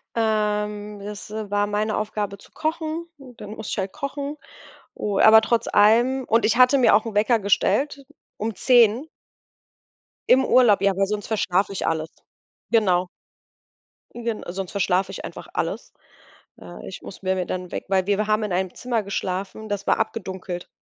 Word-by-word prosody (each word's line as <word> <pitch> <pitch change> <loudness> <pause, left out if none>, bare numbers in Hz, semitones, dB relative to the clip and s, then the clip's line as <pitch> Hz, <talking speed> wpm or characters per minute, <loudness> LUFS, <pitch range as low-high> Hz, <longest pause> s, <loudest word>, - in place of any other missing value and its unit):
Ähm, 210 -1 -1
das 205 +1 -8
war 205 -1 -1
meine 210 +1 -1
Aufgabe 210 -2 -3
zu - - -19
kochen, 320 +1 -3
dann 245 -7 -11
musste 220 0 -7
ich - - -3
halt 190 -1 -2
kochen. 285 0 -5 0.6
U 205 -2 -2
aber 220 0 +8
trotz 230 +1 0
allem 240 +6 +4
und 230 0 +2
ich 230 - +2
hatte 255 +2 +6
mir 250 - +5
auch 210 - +4
'n 225 - -5
Wecker 220 +3 +3
gestellt, 275 +8 +1 0.3
um 220 +1 -3
10. 240 +5 +4 1.2
Im 265 +1 +5
Urlaub, 240 -5 +5
ja, 195 - +4
weil 195 +1 +1
sonst 210 0 -3
verschlafe 195 -2 0
ich 195 - -3
alles. 160 0 -1 0.6
Genau. 185 -6 +3 1.1
Gen 235 -2 -4
sonst 185 +1 -5
verschlafe 195 -1 0
ich 195 - -7
einfach - - -9
alles. - - -3 0.7
Äh, - - -10
ich - - -9
muss - - -11
mir 185 0 +1
mir 180 - -2
dann 185 0 -4
'n - - -19
Weck - - -4
weil 190 -1 +1
wir 205 +1 +1
haben 215 +1 +1
in 210 -4 -2
einem 185 0 -1
Zimmer 240 -3 -2
geschlafen, 195 +2 -4
das 205 -1 -4
war - - +2
abgedunkelt. 190 -5 -4
210 Hz, 170 wpm, -23 LUFS, 195-230 Hz, 1.2 s, aber